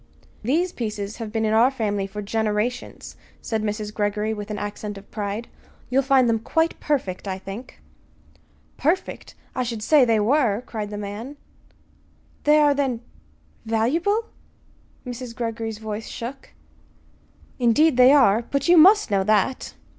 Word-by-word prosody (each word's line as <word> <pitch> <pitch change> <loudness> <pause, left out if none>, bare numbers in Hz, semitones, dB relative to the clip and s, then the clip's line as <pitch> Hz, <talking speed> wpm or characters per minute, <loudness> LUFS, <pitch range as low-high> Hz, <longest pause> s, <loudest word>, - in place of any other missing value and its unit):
"These 325 +11 +1
pieces 210 - -5
have 225 -3 -6
been 225 0 0
in 215 - +1
our 230 +3 +5
family 205 -6 -2
for 210 +1 -6
generations," 220 +3 -2 0.2
said 220 -2 -2
Mrs. 210 0 -3
Greggory 210 +1 -1
with 210 -1 -7
an 210 - -4
accent 205 0 -5
of 195 - -14
pride. 210 +2 -4 0.4
"You'll 265 +2 +4
find 265 -2 +3
them 225 -1 +2
quite 320 +8 0
perfect, 210 -11 -2
I 190 -1 -2
think." 195 +6 -9 1.0
"Perfect! 340 +6 -2 0.2
I 255 - 0
should 230 -3 -3
say 295 +4 +5
they 225 -3 +3
were," 235 -1 +2
cried 215 -3 -5
the 205 - -6
man. 210 +8 -6 1.1
"They 300 +1 +6
are, 295 -1 +5
then 265 -5 -1 0.6
valuable?" 315 - +1 0.8
Mrs. 245 -1 -7
Greggory's 225 -2 -4
voice 220 0 -6
shook. 260 +4 -7 1.1
"Indeed 255 +5 +4
they 250 +1 +7
are! 240 -7 +5
But 280 +2 -1
you 350 0 +6
must 390 - +6
know 195 -1 +2
that." 215 +4 +1
225 Hz, 145 wpm, -23 LUFS, 210-265 Hz, 1.1 s, they